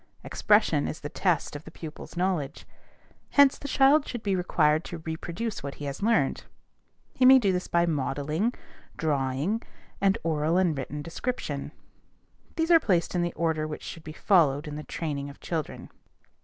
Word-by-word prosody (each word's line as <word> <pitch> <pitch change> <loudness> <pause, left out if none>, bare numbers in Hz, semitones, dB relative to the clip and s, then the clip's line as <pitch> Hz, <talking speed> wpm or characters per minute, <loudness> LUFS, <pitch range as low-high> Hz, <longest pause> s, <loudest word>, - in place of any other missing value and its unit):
"Expression 205 -9 +2
is - - -5
the 145 - -5
test 170 -5 0
of 145 - -7
the - - -11
pupil's 160 +1 -10
knowledge." 175 -6 -1 0.6
Hence, 280 -1 +5
the 285 - -6
child 280 +2 +4
should 240 -3 -5
be 200 -2 +1
required 160 -3 +2
to 170 - -6
reproduce 170 +7 -5
what 140 0 -6
he 145 - -7
has 140 +4 -5
learned. 205 -10 +1 0.7
He 260 - 0
may 260 +1 +9
do 205 -7 +2
this 180 0 -2
by 170 0 +2
modeling, 155 - -1 0.4
drawing, 145 - 0 0.4
and 195 0 +3
oral 160 +1 +1
and 180 -4 +2
written 145 +2 -5
description. 165 - -4 0.8
These 325 +1 +1
are 330 - +8
placed 180 - +1
in 175 - +1
the 175 0 -1
order 160 -1 -1
which 150 - -7
should 165 - -8
be 155 - -8
followed 155 -5 +2
in 150 - -5
the 150 - -5
training 145 -3 -4
of 140 - -13
children. 160 -4 -5
165 Hz, 170 wpm, -27 LUFS, 150-200 Hz, 0.8 s, may